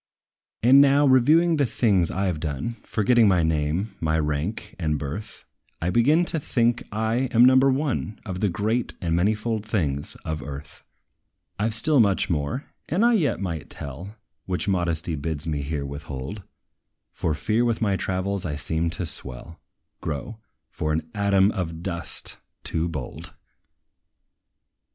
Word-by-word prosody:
And 130 +4 +8
now, 140 +1 +5
reviewing 155 +6 +5
the 140 - +3
things 100 -8 +2
I 95 +1 0
've 80 - -5
done, 75 - -3
Forgetting 115 +1 +3
my 90 -4 +3
name, 80 +5 0
my 80 -1 +1
rank 80 +8 -2
and 75 -3 0
birth, 75 +10 -6 0.3
I 85 +2 -1
begin 150 - +4
to 165 - -1
think 120 -4 +1
I 110 +4 0
am 120 +1 +6
number 130 +1 +6
one 130 -6 -1
Of 95 -3 -4
the 105 - +1
great 110 +6 -1
and 85 -2 0
manifold 105 +4 0
things 75 -10 -2
of 80 -2 -3
earth. 70 0 -9 0.8
I 105 +2 +1
've 110 - -3
still 145 +5 +5
much 100 -4 +3
more, 75 - -2 0.2
that 185 +7 +2
I 240 0 +5
yet 150 - +1
might 85 -6 -4
tell, 80 +9 -7 0.3
Which 90 +1 -2
modesty 85 -3 0
bids 75 0 -2
me 75 -3 -2
here 70 0 -3
withhold; 70 +5 -6 0.7
For 80 - -1
fear 105 +10 +1
with 115 -2 +1
my 100 -4 +1
travels 95 +1 -2
I 75 -4 -3
seem 80 +2 -1
to 90 - -2
swell, 70 +1 -6 0.4
grow, 110 +10 -5 0.3
for 75 - -2
an 80 0 -3
ATOM 100 -1 +3
OF 85 -4 -4
DUST, 85 -3 -4 0.3
too 80 +1 -1
bold! 70 -7 -7
95 Hz, 155 wpm, -24 LUFS, 80-115 Hz, 0.8 s, And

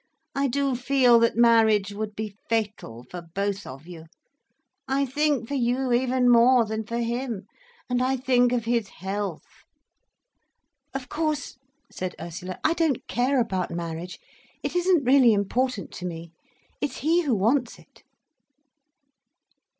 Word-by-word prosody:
I 275 0 +1
do 275 0 0
feel 250 -1 +4
that 230 0 +2
marriage 220 -4 +4
would 210 0 -5
be 215 -1 -5
fatal, 210 - -2
for 180 - -6
both 200 +4 -3
of 135 +4 -10
you. 170 -2 -10 0.8
I 275 +1 +1
think 285 -2 0
for 285 - -5
you 250 0 0
even 250 0 +2
more 240 0 +6
than 220 0 -4
for 235 - -3
him—and 245 - -4
I 260 +1 +1
think 250 -1 +3
of 240 -2 -1
his 230 -3 0
health—" 195 -2 -4 1.5
"Of 265 -2 -4
course," 300 -3 -3 0.3
said 185 -1 -5
Ursula, 180 +2 -6
"I 315 +1 +3
don't 320 -7 0
care 255 +3 +1
about 190 -6 -1
marriage—it 170 - -7
isn't 355 -5 +2
really 255 -3 +6
important 210 +2 -1
to 180 - -6
me—it's 165 - -8
he 335 +3 +4
who 280 -8 +1
wants 235 +5 +1
it." - - -21
235 Hz, 135 wpm, -25 LUFS, 200-265 Hz, 1.5 s, more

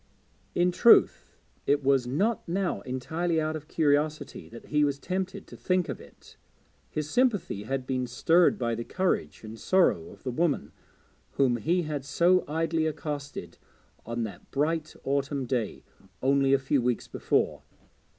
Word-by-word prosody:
In 180 +1 +3
truth 230 +6 +4 0.3
it 145 0 +2
was 135 -2 +3
not 195 - 0
now 185 +1 -1
entirely 160 +7 -2
out 155 0 -1
of 155 -1 -7
curiosity 150 -1 0
that 115 - -11
he 150 0 +3
was 140 -1 +1
tempted 190 +4 -4
to - - -12
think 185 -2 0
of - - -5
it; - - -17 0.5
his 155 -1 -3
sympathy 205 - 0
had 135 +1 -2
been 130 -1 -1
stirred 165 +8 +3
by 120 -2 -1
the 115 +1 -3
courage 175 - -1
and 110 +1 -9
sorrow 190 +2 +2
of - - -15
the 130 - -2
woman 160 +3 0 0.6
whom 130 -3 +2
he 175 +8 +1
had 150 -3 -3
so 175 +6 +3
idly 160 +1 0
accosted 145 -2 -5 0.4
on 115 +1 -3
that 105 -4 -8
bright 155 +3 -1
autumn 140 0 -1
day 120 -4 -2 0.4
only 135 0 +3
a 135 - +6
few 135 0 +1
weeks 120 -1 -1
before. - - 0
145 Hz, 155 wpm, -28 LUFS, 130-170 Hz, 0.6 s, a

